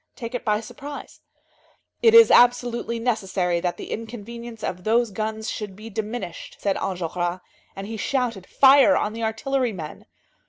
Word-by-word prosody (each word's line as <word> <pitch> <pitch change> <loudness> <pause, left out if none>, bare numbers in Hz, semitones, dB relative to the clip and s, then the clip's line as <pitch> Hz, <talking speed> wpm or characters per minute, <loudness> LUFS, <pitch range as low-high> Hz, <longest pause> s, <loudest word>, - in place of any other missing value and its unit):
take 230 0 -7
it 245 - -3
by 210 -1 +1
surprise. 285 +5 -9 0.8
"It 455 -1 +6
is 460 0 +9
absolutely 240 -1 +3
necessary 195 -7 0
that 175 0 -2
the - - -8
inconvenience 230 +1 -7
of 180 0 -4
those 230 +1 +2
guns 220 +2 -4
should 205 -3 -6
be 220 +3 -10
diminished," 210 -4 -5
said 195 -2 0
Enjolras, 175 -1 -3 0.3
and 195 - -6
he 220 +2 -6
shouted: 230 -5 -2
"Fire 275 +1 +6
on 210 - -1
the 230 - -6
artillery 235 +2 -1
men!" 160 -5 -8
220 Hz, 155 wpm, -23 LUFS, 195-245 Hz, 0.8 s, is